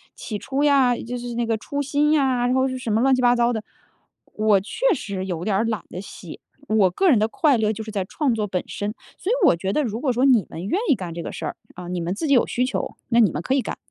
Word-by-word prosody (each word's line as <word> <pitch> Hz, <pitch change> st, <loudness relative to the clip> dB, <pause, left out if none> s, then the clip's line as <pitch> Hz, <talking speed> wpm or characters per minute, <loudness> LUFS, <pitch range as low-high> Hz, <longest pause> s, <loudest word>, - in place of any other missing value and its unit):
起 210 Hz, -3 st, -5 dB
初 275 Hz, +1 st, -2 dB
呀， 270 Hz, -4 st, +4 dB
就 245 Hz, +2 st, -5 dB
是 240 Hz, -1 st, -6 dB
那 240 Hz, 0 st, 0 dB
个 225 Hz, -1 st, 0 dB
初 285 Hz, +6 st, -4 dB
心 295 Hz, +2 st, +1 dB
呀， 255 Hz, -4 st, +2 dB
或 260 Hz, +1 st, +2 dB
者 -, -, -2 dB
是 255 Hz, -, -4 dB
什 230 Hz, -3 st, -3 dB
么 220 Hz, -, +2 dB
乱 265 Hz, 0 st, +4 dB
七 255 Hz, -, -1 dB
八 245 Hz, 0 st, +4 dB
糟 240 Hz, 0 st, +2 dB
的。 220 Hz, -1 st, -3 dB, 0.7 s
我 215 Hz, -2 st, +3 dB
确 475 Hz, -, 0 dB
实 195 Hz, -6 st, -5 dB
有 175 Hz, -2 st, -3 dB
点 205 Hz, -3 st, +1 dB
儿 220 Hz, +4 st, +1 dB
懒 220 Hz, -5 st, -2 dB
得 180 Hz, -, -6 dB
写， 180 Hz, -4 st, -10 dB, 0.3 s
我 210 Hz, -4 st, +3 dB
个 370 Hz, -, +2 dB
人 230 Hz, -, +4 dB
的 215 Hz, -, +2 dB
快 285 Hz, +1 st, +2 dB
乐 215 Hz, 0 st, +2 dB
就 220 Hz, +1 st, -5 dB
是 215 Hz, -, -8 dB
在 195 Hz, -3 st, -1 dB
创 270 Hz, +3 st, 0 dB
作 210 Hz, -2 st, -1 dB
本 185 Hz, -2 st, -2 dB
身。 205 Hz, +2 st, -4 dB, 0.2 s
所 400 Hz, -, -2 dB
以 -, -, +3 dB
我 -, -, +6 dB
觉 190 Hz, +3 st, -3 dB
得 300 Hz, -, +1 dB
如 225 Hz, -1 st, -3 dB
果 265 Hz, -, +1 dB
说 250 Hz, +3 st, +2 dB
你 240 Hz, -, +4 dB
们 170 Hz, +3 st, -7 dB
愿 355 Hz, -, 0 dB
意 275 Hz, -, +5 dB
干 180 Hz, -4 st, -6 dB
这 170 Hz, -, -5 dB
个 -, -, -6 dB
事 -, -, -6 dB
儿， -, -, -4 dB, 0.2 s
啊， 180 Hz, -1 st, -8 dB
你 180 Hz, -1 st, -3 dB
们 175 Hz, +3 st, -2 dB
自 320 Hz, -, -3 dB
己 280 Hz, -, +3 dB
有 245 Hz, -, +4 dB
需 250 Hz, +1 st, 0 dB
求， 260 Hz, -, -3 dB
那 235 Hz, 0 st, +3 dB
你 215 Hz, -6 st, +6 dB
们 150 Hz, -, -3 dB
可 260 Hz, -, 0 dB
以 270 Hz, -, +2 dB
干。 -, -, -5 dB
230 Hz, 315 characters per minute, -23 LUFS, 200-260 Hz, 0.7 s, 我